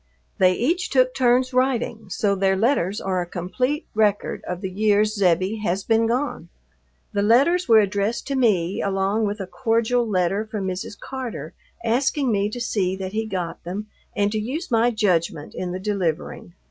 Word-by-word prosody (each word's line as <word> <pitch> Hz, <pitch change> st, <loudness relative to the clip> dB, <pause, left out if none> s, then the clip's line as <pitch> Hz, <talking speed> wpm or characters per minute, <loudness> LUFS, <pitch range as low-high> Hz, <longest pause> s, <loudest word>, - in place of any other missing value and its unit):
They 185 Hz, -1 st, +5 dB
each 335 Hz, -, 0 dB
took 255 Hz, -1 st, +3 dB
turns 255 Hz, 0 st, +2 dB
writing, 240 Hz, -4 st, 0 dB
so 200 Hz, +2 st, +1 dB
their 190 Hz, 0 st, +2 dB
letters 210 Hz, -2 st, +1 dB
are 185 Hz, -2 st, -1 dB
a -, -, -3 dB
complete 250 Hz, -, -2 dB
record 210 Hz, -1 st, +1 dB
of 180 Hz, 0 st, -4 dB
the 190 Hz, -, -3 dB
years 210 Hz, +1 st, +2 dB
"Zebbie" 190 Hz, +1 st, +1 dB
has 195 Hz, -2 st, -1 dB
been 225 Hz, 0 st, +2 dB
gone. 255 Hz, +5 st, -2 dB, 0.6 s
The 200 Hz, -, +1 dB
letters 275 Hz, -, +3 dB
were 225 Hz, -, +8 dB
addressed 205 Hz, +2 st, +1 dB
to 275 Hz, -, 0 dB
me 195 Hz, -8 st, +2 dB
along 195 Hz, +2 st, 0 dB
with 205 Hz, +1 st, -4 dB
a 195 Hz, -, -3 dB
cordial 230 Hz, +4 st, 0 dB
letter 190 Hz, +1 st, +1 dB
from 215 Hz, -3 st, -5 dB
Mrs. 190 Hz, +2 st, -5 dB
Carter 260 Hz, -3 st, -6 dB, 0.3 s
asking 265 Hz, +3 st, +1 dB
me 205 Hz, -1 st, +1 dB
to 245 Hz, -, -6 dB
see 190 Hz, -5 st, 0 dB
that 190 Hz, 0 st, -6 dB
he 220 Hz, +1 st, -1 dB
got 185 Hz, -5 st, -4 dB
them 200 Hz, +5 st, -5 dB, 0.3 s
and 205 Hz, 0 st, +1 dB
to 215 Hz, -, -1 dB
use 265 Hz, +10 st, -4 dB
my 230 Hz, +1 st, +4 dB
judgment 180 Hz, -9 st, 0 dB
in 180 Hz, -1 st, -4 dB
the 185 Hz, -, -4 dB
delivering. 180 Hz, -3 st, -3 dB
210 Hz, 175 wpm, -23 LUFS, 190-240 Hz, 0.6 s, were